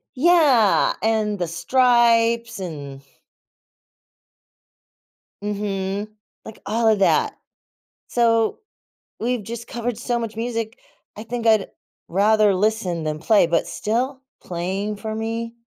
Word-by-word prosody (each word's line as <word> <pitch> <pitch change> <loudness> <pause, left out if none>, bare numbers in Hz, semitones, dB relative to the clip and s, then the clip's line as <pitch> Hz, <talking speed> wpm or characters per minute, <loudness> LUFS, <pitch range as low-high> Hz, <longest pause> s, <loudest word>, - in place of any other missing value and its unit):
Yeah. 280 - +4
And 215 -2 0
The 175 - -1
Stripes 235 +1 +2
and 145 -6 -7 2.4
Mhm. 200 0 -3 0.4
Like, 220 - -10
all 225 +3 0
of 215 -2 +4
that. 195 - +2 0.7
So, 230 -2 +2 0.6
we've 240 -1 -1
just 235 +3 -7
covered 235 -1 -3
so 240 -1 -1
much 225 -2 -5
music. 230 0 -3 0.4
I 215 - -7
think 235 0 -4
I'd 220 -3 +3 0.4
rather 210 +2 +3
listen 185 -5 0
than 155 0 -3
play, 210 -1 +4
but 165 0 0
still 255 +5 -2 0.2
playing 190 +4 -3
for 220 +1 -5
me, 230 +1 -4
220 Hz, 110 wpm, -22 LUFS, 200-235 Hz, 2.4 s, Yeah